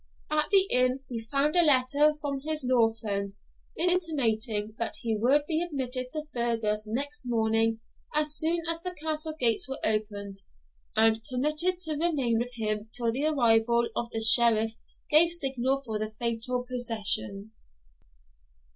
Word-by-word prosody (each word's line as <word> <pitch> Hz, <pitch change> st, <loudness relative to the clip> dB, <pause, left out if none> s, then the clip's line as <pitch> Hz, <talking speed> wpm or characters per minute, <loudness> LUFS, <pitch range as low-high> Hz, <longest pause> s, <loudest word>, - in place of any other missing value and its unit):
At 305 Hz, 0 st, 0 dB
the 390 Hz, -2 st, +6 dB
inn 255 Hz, +1 st, +3 dB
he 230 Hz, -3 st, -6 dB
found 280 Hz, +6 st, 0 dB
a 350 Hz, -, +6 dB
letter 290 Hz, 0 st, +4 dB
from 280 Hz, -2 st, -4 dB
his 305 Hz, 0 st, -3 dB
law 240 Hz, -3 st, +3 dB
friend 205 Hz, -3 st, -4 dB, 0.5 s
intimating 245 Hz, -, 0 dB
that 230 Hz, -, -3 dB
he 225 Hz, -2 st, -1 dB
would 265 Hz, +7 st, +1 dB
be 320 Hz, +1 st, 0 dB
admitted 260 Hz, -6 st, -3 dB
to 305 Hz, -1 st, -4 dB
Fergus 225 Hz, -3 st, -1 dB
next 285 Hz, +6 st, -3 dB
morning 225 Hz, -1 st, 0 dB, 0.3 s
as 305 Hz, 0 st, +2 dB
soon 335 Hz, +2 st, +1 dB
as 330 Hz, 0 st, -2 dB
the 360 Hz, 0 st, -5 dB
Castle 310 Hz, 0 st, -1 dB
gates 235 Hz, +1 st, +2 dB
were 270 Hz, -, -4 dB
opened, 205 Hz, -2 st, -2 dB, 0.6 s
and 225 Hz, 0 st, +2 dB
permitted 305 Hz, +8 st, 0 dB
to 320 Hz, -3 st, -1 dB
remain 280 Hz, -9 st, 0 dB
with 245 Hz, +1 st, -5 dB
him 215 Hz, -1 st, -3 dB
till 235 Hz, -2 st, -2 dB
the 270 Hz, +6 st, -2 dB
arrival 235 Hz, -4 st, +2 dB
of 235 Hz, -, -3 dB
the 225 Hz, -1 st, -4 dB
Sheriff 225 Hz, -1 st, +6 dB, 0.4 s
gave 335 Hz, +3 st, +6 dB
signal 270 Hz, -3 st, -1 dB
for 220 Hz, -2 st, -4 dB
the 215 Hz, 0 st, -3 dB
fatal 235 Hz, +3 st, -2 dB
procession. 220 Hz, -, -3 dB
250 Hz, 150 wpm, -27 LUFS, 225-300 Hz, 0.6 s, the